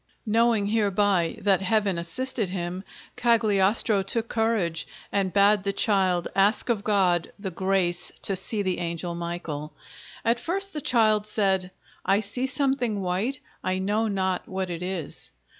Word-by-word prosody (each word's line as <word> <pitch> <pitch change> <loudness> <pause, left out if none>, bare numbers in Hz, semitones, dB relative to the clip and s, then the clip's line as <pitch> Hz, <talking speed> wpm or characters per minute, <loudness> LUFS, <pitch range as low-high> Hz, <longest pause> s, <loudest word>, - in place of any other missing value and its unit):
Knowing 225 -1 +3
hereby 205 -4 +1
that 195 -2 +3
Heaven 195 -2 +1
assisted 220 +5 -1
him, 180 0 -4 0.3
Cagliostro 215 -3 +3
took 225 +4 -1
courage, 220 -8 0 0.2
and 195 -2 0
bade 200 +1 +4
the 200 +1 -1
child 190 -5 +2
ask 200 +5 +2
of 215 -4 +1
God 185 -5 +2
the 200 -2 -5
grace 185 -1 0
to 195 - +1
see 200 +3 0
the 185 -2 -1
angel 170 0 -3
Michael. 170 -3 -5 0.5
At 235 +1 +2
first 390 +7 -2
the 300 - -3
child 215 -5 +3
said: 190 -4 +1 0.3
"I 195 +2 +3
see 245 +5 -2
something 265 -5 0
white; 195 +9 -1 0.2
I 185 0 0
know 205 +4 0
not 190 -3 -1
what 190 -1 -3
it 170 0 -5
is." 180 -4 -5
200 Hz, 145 wpm, -26 LUFS, 185-220 Hz, 0.5 s, bade